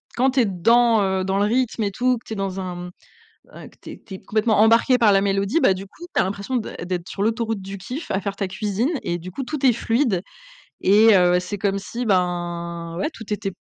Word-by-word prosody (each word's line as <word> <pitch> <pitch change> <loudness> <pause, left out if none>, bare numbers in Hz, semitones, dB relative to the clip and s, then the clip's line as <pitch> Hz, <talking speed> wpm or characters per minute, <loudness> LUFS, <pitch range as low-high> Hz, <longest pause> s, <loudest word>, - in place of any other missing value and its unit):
Quand 260 +2 +2
tu 265 - +1
es 240 - +4
dans, 225 +3 +3
heu, 190 -1 0
dans 190 +1 -1
le 205 - +2
rythme 230 0 0
et 200 - -1
tout, 250 +4 +1
que 230 - -14
tu 220 - -6
es - - -4
dans 195 -1 -3
un, 185 -1 -5
mmh, 175 0 -7 0.6
un - - -11
que - - -23
tu - - -9
es - - -10
que - - -33
tu 195 - -9
es - - -7
complètement 215 0 +1
embarquée 230 +4 +5
par 225 -3 +5
la 195 -1 +4
mélodie, 200 +8 +1
bah, 190 - +4
du 190 +1 -7
coup 270 - -14
tu - - +3
as - - +4
l'impression 200 +6 -3
d'ê 230 - -4
d'être 180 -1 -4
sur 195 - -4
l'autoroute 225 -1 -1
du 195 +1 -7
kiff, 255 - -7
à 190 - 0
faire 200 +1 -4
ta 200 - -2
cuisine 210 - -2
et 175 0 -2
du 180 +2 -9
coup, 270 - -5
tout 275 +1 -4
est 250 - +6
fluide 230 -4 0 0.6
et 210 +2 +6
heu, 180 -1 +4
c'est 205 +2 -5
comme 200 -1 0
si, 235 +4 -5
ben, 175 -3 -2
ouais, 300 - -1
tout 225 - -10
était 205 -1 -2
200 Hz, 260 wpm, -22 LUFS, 190-230 Hz, 0.6 s, est